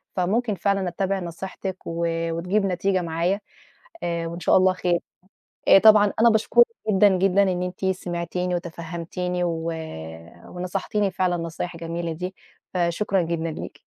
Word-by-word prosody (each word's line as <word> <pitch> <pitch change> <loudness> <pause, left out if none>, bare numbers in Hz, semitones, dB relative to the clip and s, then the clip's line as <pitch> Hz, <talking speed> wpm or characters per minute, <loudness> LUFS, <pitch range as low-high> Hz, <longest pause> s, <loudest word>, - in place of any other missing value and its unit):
فممكن 210 +4 +1
فعلًا 195 0 0
أتبّع 190 +2 -1
نصيحتِك، 185 +2 -5
و 170 0 -1 0.2
وتجيب 180 +5 0
نتيجة 190 0 +1
معايا 170 +4 0 0.6
آآ 170 -1 -1
وإن 170 +1 -6
شاء 175 - +4
الله 185 0 +4
خير. 175 -1 0 0.9
طبعًا 210 -2 +7
أنا 235 0 +7
باشكرِك 220 - +5 0.2
جدًا، 205 0 +6
جدًا 195 +1 +4
إن 180 -2 0
أنتِ 180 +1 -5
سِمعتيني 180 -1 -2
وتفهمتيني 175 +1 -3
و 165 -1 -2 0.8
ونصحتيني 190 +3 -2
فعلًا 180 -1 0
النصايح 170 +1 -4
الجميلة 165 0 -4
دي، 180 +4 -5 0.4
فشكرًا 180 +2 +1
جدًا 165 0 -2
ليكِ. - - -8
180 Hz, 135 wpm, -24 LUFS, 170-195 Hz, 0.9 s, طبعًا